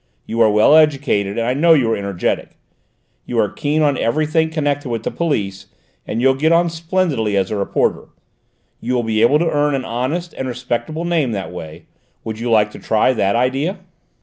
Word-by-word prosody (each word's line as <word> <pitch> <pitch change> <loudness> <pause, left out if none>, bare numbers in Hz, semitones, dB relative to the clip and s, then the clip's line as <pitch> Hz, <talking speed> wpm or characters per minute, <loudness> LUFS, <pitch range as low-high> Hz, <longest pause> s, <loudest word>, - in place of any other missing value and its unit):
You 115 +1 -2
are 110 - +6
well 105 +8 +5
educated, 135 -10 +2
and 115 - 0
I 125 - +1
know 165 +4 +5
you 120 -6 +2
are - - +2
energetic. 100 -3 -3 0.7
You 120 - -3
are 105 - +2
keen 150 +2 0
on 145 -3 +1
everything 155 +6 +1
connected 145 -3 -2
with 115 -2 -3
the - - -2
police, 100 - -2 0.4
and 110 - -3
you'll 135 +2 +4
get 155 +5 +1
on 170 0 +3
splendidly 160 - -1
as 95 -1 0
a - - -1
reporter. 100 -1 -1 0.7
You 125 - -2
will 120 - 0
be 110 -1 0
able 120 +6 +5
to 165 +1 0
earn 145 -1 +1
an 130 - -3
honest 145 +9 -3
and 130 - -5
respectable 125 +6 -3
name 160 -9 0
that 95 -3 -4
way. 80 -2 -9 0.4
Would 110 0 -6
you 120 +1 -3
like 105 -2 +3
to - - -11
try 110 +4 +2
that 100 -3 0
idea?" 135 - 0
125 Hz, 200 wpm, -18 LUFS, 110-155 Hz, 0.7 s, are